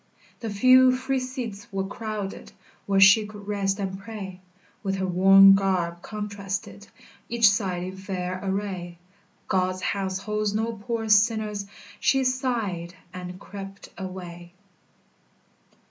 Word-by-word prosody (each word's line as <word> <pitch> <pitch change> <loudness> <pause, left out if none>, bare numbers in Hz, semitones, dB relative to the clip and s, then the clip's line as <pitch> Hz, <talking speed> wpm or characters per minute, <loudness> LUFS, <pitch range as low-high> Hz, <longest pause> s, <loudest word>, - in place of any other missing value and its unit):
The 230 - -4
few 255 +4 +6
free 265 +1 -1
seats 250 -6 -6
were 195 -1 -2
crowded 210 -1 -6 0.3
Where 195 -1 +3
she 205 +2 +7
could 205 -1 -11
rest 200 -1 0
and 190 -1 -3
pray; 195 -3 -8 0.4
With 195 -2 -1
her 190 0 -1
worn 195 +2 +7
garb 180 -3 0
contrasted 200 -1 -5 0.4
Each 235 -2 +5
side 185 -4 -1
in 185 +1 -6
fair 185 -1 -4
array, 190 -3 -3 0.5
"God's 185 0 0
house 190 -2 -1
holds 210 +1 -2
no 225 +2 -1
poor 225 +1 -4
sinners," 210 -1 +2 0.3
She 270 -1 +3
sighed, 230 -10 -1 0.2
and 180 0 -7
crept 195 -1 -9
away. 175 -2 -8
200 Hz, 125 wpm, -25 LUFS, 190-215 Hz, 0.5 s, she